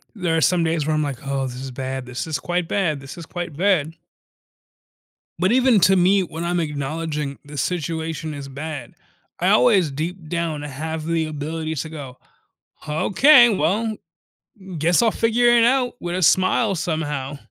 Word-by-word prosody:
there 175 -5 -1
are - - +1
some 175 +1 +3
days 160 -2 0
where 155 - +1
I'm 155 - +1
like, 140 -3 -5
"Oh, 135 -1 -1
this 125 0 -6
is 135 - -6
bad. 130 0 -5
This 125 0 -4
is 155 - -2
quite 175 -1 -2
bad. 165 -8 0
This 135 0 -10
is 170 - -8
quite 175 -4 -6
bad." 165 -3 +1 1.5
But 185 +3 +2
even 250 -3 +4
to 190 - +5
me, 190 +2 +4
when 170 -2 -5
I'm 175 +1 0
acknowledging 150 -1 -3
the 145 0 -10
situation 160 0 -3
is 140 -1 -7
bad, 145 +2 -7 0.5
I - - +2
always, 160 +7 +4
deep 160 +3 -5
down, 165 -3 -2
have 155 +3 -5
the 165 -1 0
ability 155 +1 -4
to 160 +2 -4
go, 140 -5 -9 0.7
"Okay, 240 - +6
well, 215 +2 0 0.8
guess 165 +6 +3
I'll 230 -2 +3
figure 230 +2 +2
it 240 -1 +5
out 250 +1 +2
with 175 0 -3
a - - -2
smile 185 +5 +3
somehow." 150 -5 -3
160 Hz, 170 wpm, -22 LUFS, 145-185 Hz, 1.5 s, Okay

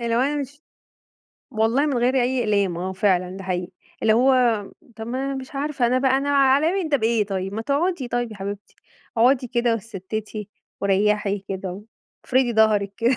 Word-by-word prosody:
اللي 235 -1 0
هو - - +3
أنا 285 +3 +1
مش 285 +3 -8 0.9
والله 230 +6 +1
من 275 -5 0
غير 250 +2 +2
أي 255 0 +1
أقلام، 200 -5 +1
آه 185 +2 -3
فعلًا 185 -2 +1
ده 195 - -8
حقيقي 180 -1 -3 0.3
اللي 220 - +4
هو 255 +4 +4 0.6
طَب 220 0 -7
ما 260 +3 -3
أنا 275 - -2
مش 265 +1 -8
عارفة 280 -3 0
أنا 255 +2 +2
بقى 265 0 +3
أنا 280 +1 -1
عليَّ 280 +3 +4
من 320 - -3
ده 290 - +3
بإيه 225 -2 +1
طيب؟ 195 -1 -3
ما 225 - -3
تقعدي 285 0 -1
طيب 240 -1 -2
يا - - -10
حبيبتي، 200 +1 -7 0.4
اقعدي 250 +2 +4
كده 240 0 +1
واتستِّتي 215 0 -6 0.3
وريّحي 205 +1 +1
كده، 190 0 -5 0.4
وافردي 255 -1 +2
ضهرِك 215 -3 +3
كده 235 +2 +2
230 Hz, 185 wpm, -23 LUFS, 200-265 Hz, 0.9 s, اللي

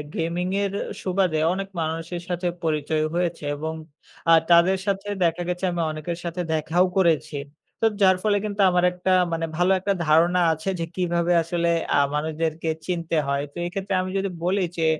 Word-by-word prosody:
গেমিংয়ের 180 +4 -1 0.3
সুবাদে 185 -4 +1
অনেক 195 +1 -4
মানুষের 165 +2 -3
সাথে 180 0 -2 0.2
পরিচয় 155 -1 0
হয়েছে 175 -2 -1
এবং 160 +2 -4 0.6
আ - - +9 0.2
তাদের 170 +3 +6
সাথে 200 0 -1 0.2
দেখা 165 +1 0
গেছে 180 +1 -3
আমি 175 -1 -2
অনেকের 155 +2 -5
সাথে 170 +1 -3
দেখাও 160 +4 +2
করেছি। 165 -5 +2 0.5
তো - - +3 0.2
যার 185 -1 +6
ফলে 205 -1 +3
কিন্তু 205 0 -2
আমার 180 0 +2
একটা 180 +1 -2 0.2
মানে 165 0 -1
ভালো 180 +2 +3
একটা 200 +2 0
ধারণা 170 +4 +4
আছে 160 +4 -4
যে 165 - -1
কিভাবে 175 -1 0
আসলে 170 0 0 0.3
আ - - +5 0.2
মানুষদেরকে 160 +1 -2 0.2
চিনতে 170 -2 -1
হয়। 140 0 0
তো - - -13
এক্ষেত্রে 195 +2 -3
আমি 185 - -4
যদি 195 0 -1 0.2
বলি 195 +2 +1 0.2
যে 165 - +1
175 Hz, 170 wpm, -24 LUFS, 160-185 Hz, 0.6 s, আ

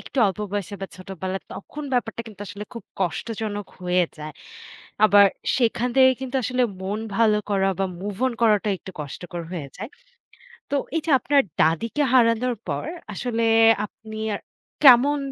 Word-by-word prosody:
একটু 275 - -7
অল্প 195 +1 -2
বয়সে 205 0 -3
বা 195 - -3
ছোটবেলায় 190 0 -5
তখন 300 +8 -8
ব্যাপারটা 230 -2 -1
কিন্তু 205 -2 -12
আসলে 205 +2 -7
খুব 230 - -7 0.2
কষ্টজনক 205 +3 -3
হয়ে 180 0 +2
যায়। 150 0 -7 0.7
আবার 205 -1 +7 0.3
সেখান 240 0 +1
থেকে 260 0 +7
কিন্তু 265 0 -3
আসলে 250 +2 0 0.2
মন 200 +3 -2 0.2
ভালো 220 -2 +4
করা 195 -1 +2
বা 195 - +1 0.2
move 200 0 -5
on 255 - 0
করাটা 210 -2 +3
একটু 190 - -10
কষ্টকর 170 +4 -6
হয়ে 150 -6 -5
যায়। 215 +6 -6 0.8
তো - - -1 0.2
এই - - +2
যে - - 0
আপনার 285 +1 +3 0.2
দাদিকে 220 - +1
হারানোর 240 0 +3
পর - - -2 0.3
আসলে 230 +2 -2 0.4
আপনি 220 +1 -9 0.2
আর - - -5 0.4
কেমন 275 +3 +7
210 Hz, 155 wpm, -23 LUFS, 190-245 Hz, 0.8 s, আবার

